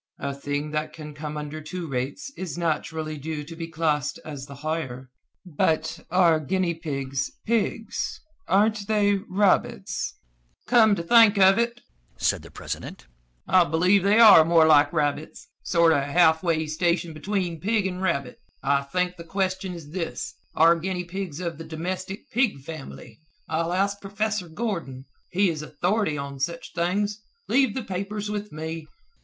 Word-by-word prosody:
A 140 0 -3
thing 145 +2 -3
that 150 0 -2
can 150 -2 -9
come 150 +1 -6
under 150 +1 -5
two 175 +3 -6
rates 135 - -4
is 175 -5 -5
naturally 160 -2 -2
due 150 +1 -4
to 165 +3 -10
be 165 0 -5
classed 155 -3 -1
as 140 -3 -7
the 140 - -10
higher. 135 -5 -3 0.3
But 160 0 0
are 170 -3 +4
guinea 180 +3 0
pigs, 140 -4 -3 0.2
pigs? 225 0 -1 0.3
Aren't 205 +1 +2
they 205 -2 +2
rabbits?" 195 +1 +1 0.5
"Come 220 -4 +5
to 170 - -4
think 220 +2 +6
of 195 +2 +6
it," 235 0 -1 0.4
said - - +1
the - - -13
president, - - -7 0.4
"I 185 - +6
believe 180 +5 +3
they 200 +3 +3
are 215 -8 +9
more 165 0 +5
like 145 -2 +5
rabbits. 150 -1 -2
Sort 170 -2 +4
of 145 - +2
half 160 +2 +4
way 165 -3 +1
station 170 +2 0
between 175 0 -2
pig 210 +1 +1
and 185 -1 -3
rabbit. 140 -9 -1 0.2
I 140 +1 +2
think 180 +6 -2
the 170 - -8
question 190 +1 -2
is 155 -3 -10
this 170 -1 -4 0.2
are 165 +1 +5
guinea 180 +1 -2
pigs 175 -3 -5
of 170 -3 -4
the - - -6
domestic 185 +5 -5
pig 235 - +1
family? 135 -6 -9 0.3
I'll 165 +2 -1
ask 200 +2 0
professor 205 -2 -2
Gordon. 165 - -4 0.2
He 190 0 +2
is 155 -2 -5
authority 175 +3 -1
on 140 -1 -6
such 170 +5 -3
things. 205 +5 -1 0.3
Leave 265 +1 +3
the 260 - -2
papers 205 +2 -4
with 210 0 -4
me." 160 +1 -6
170 Hz, 160 wpm, -25 LUFS, 155-195 Hz, 0.5 s, are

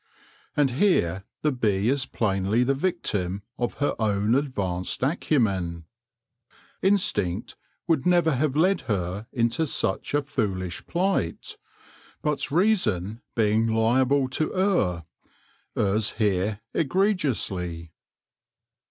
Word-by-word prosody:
And 145 -3 +3
here 100 - +2 0.2
the 150 - +3
bee 105 -5 0
is 130 +1 +1
plainly 100 +2 +1
the 135 +2 +2
victim 105 - -2 0.2
of 120 -1 -1
her 145 - 0
own 105 0 +1
advanced 100 -10 -1
acumen. 100 - 0 1.0
Instinct 110 - +1 0.3
would 160 -6 +2
never 175 -2 +3
have 135 +1 0
led 185 +6 +3
her 95 +1 -2
into 120 +6 +1
such 145 - -1
a 145 - +2
foolish 95 -10 -2
plight; 180 - -1 0.7
but 150 -1 0
reason, 120 - +1
being 110 0 +2
liable 125 +5 +2
to 155 +4 0
err, 170 - +1 0.7
errs 105 +1 +1
here 105 -1 0
egregiously. 130 - 0
115 Hz, 105 wpm, -25 LUFS, 95-150 Hz, 1.0 s, And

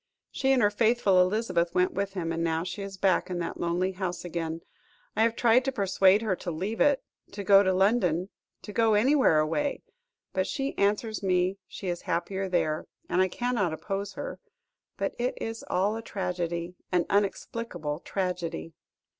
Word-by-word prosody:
She 270 0 +1
and 255 -3 +4
her 205 - +4
faithful 215 -3 +3
Elizabeth 180 -3 +1
went 180 0 +2
with 200 0 -2
him, 170 -4 -2
and 165 0 -1
now 165 0 0
she 185 +3 -5
is 195 -1 -6
back 190 -1 +2
in 180 - -2
that 170 -1 -4
lonely 175 +2 0
house 185 -2 -4
again. 165 -1 -3 0.5
I - - +1
have 230 0 +3
tried 240 +2 +4
to 270 - +1
persuade 195 -2 +3
her 205 -4 +1
to 175 - -5
leave 190 +7 -3
it 285 -2 +4 0.3
to 200 0 -5
go 195 +1 +7
to 190 -2 +2
London 185 -2 +2 0.3
to 210 - -8
go 225 -1 +3
anywhere 255 - +4
away 165 - 0 0.5
but 185 0 0
she 275 0 -2
answers 210 +2 0
me 185 0 +1
she 195 - -7
is 175 -1 -2
happier 190 +3 -2
there, 155 -4 0 0.2
and 180 - +2
I 185 - +4
cannot 215 -4 -1
oppose 195 +4 -4
her. - - -6 0.6
But - - -1
it - - -1
is 225 0 -5
all 195 +4 +1
a 225 - -4
tragedy, 180 -4 -3 0.2
an 180 -2 +2
inexplicable 195 -5 -1
tragedy." 175 -3 -3
190 Hz, 180 wpm, -28 LUFS, 175-215 Hz, 0.6 s, go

